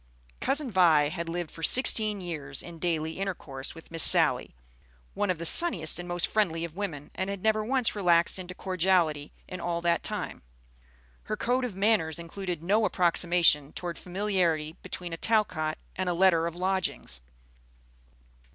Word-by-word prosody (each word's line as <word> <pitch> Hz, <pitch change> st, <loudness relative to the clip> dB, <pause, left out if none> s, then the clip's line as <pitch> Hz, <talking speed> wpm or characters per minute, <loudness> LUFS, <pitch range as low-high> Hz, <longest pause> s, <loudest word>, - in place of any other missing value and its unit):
Cousin 280 Hz, -3 st, 0 dB
Vi 165 Hz, -6 st, +4 dB
had 170 Hz, +1 st, -5 dB
lived 175 Hz, -1 st, -4 dB
for 165 Hz, -, -11 dB
sixteen 215 Hz, +1 st, +5 dB
years 150 Hz, -6 st, -4 dB
in 170 Hz, -1 st, -11 dB
daily 160 Hz, -1 st, -2 dB
intercourse 155 Hz, -9 st, -6 dB
with 165 Hz, -, -14 dB
Miss 165 Hz, -1 st, -2 dB
Sally, -, -, +6 dB, 0.6 s
one 205 Hz, -, -2 dB
of 180 Hz, -, 0 dB
the 170 Hz, -, -6 dB
sunniest 175 Hz, -, +3 dB
and 175 Hz, -, -7 dB
most 175 Hz, 0 st, 0 dB
friendly 170 Hz, -6 st, -1 dB
of 165 Hz, -1 st, -11 dB
women, 170 Hz, -8 st, -6 dB
and 190 Hz, +1 st, -4 dB
had 200 Hz, -2 st, -6 dB
never 215 Hz, -1 st, +1 dB
once 250 Hz, 0 st, +1 dB
relaxed 175 Hz, -2 st, +2 dB
into 180 Hz, 0 st, -9 dB
cordiality 175 Hz, -6 st, 0 dB, 0.2 s
in 185 Hz, -1 st, -8 dB
all 170 Hz, -1 st, -2 dB
that 170 Hz, -1 st, 0 dB
time. -, -, -4 dB, 0.8 s
Her 215 Hz, -, -4 dB
code 250 Hz, +4 st, -1 dB
of 225 Hz, -7 st, -6 dB
manners 195 Hz, -6 st, +1 dB
included 170 Hz, 0 st, -6 dB
no 210 Hz, +5 st, +1 dB
approximation 170 Hz, -5 st, +2 dB
toward 175 Hz, -1 st, -6 dB
familiarity 175 Hz, -5 st, -1 dB
between 175 Hz, -2 st, -7 dB
a -, -, -5 dB
Talcott 165 Hz, -8 st, -1 dB, 0.2 s
and 185 Hz, -1 st, -2 dB
a 175 Hz, -, -1 dB
letter 170 Hz, -2 st, +3 dB
of 170 Hz, -, -7 dB
lodgings. 185 Hz, -, -3 dB
175 Hz, 160 wpm, -27 LUFS, 165-195 Hz, 0.8 s, Sally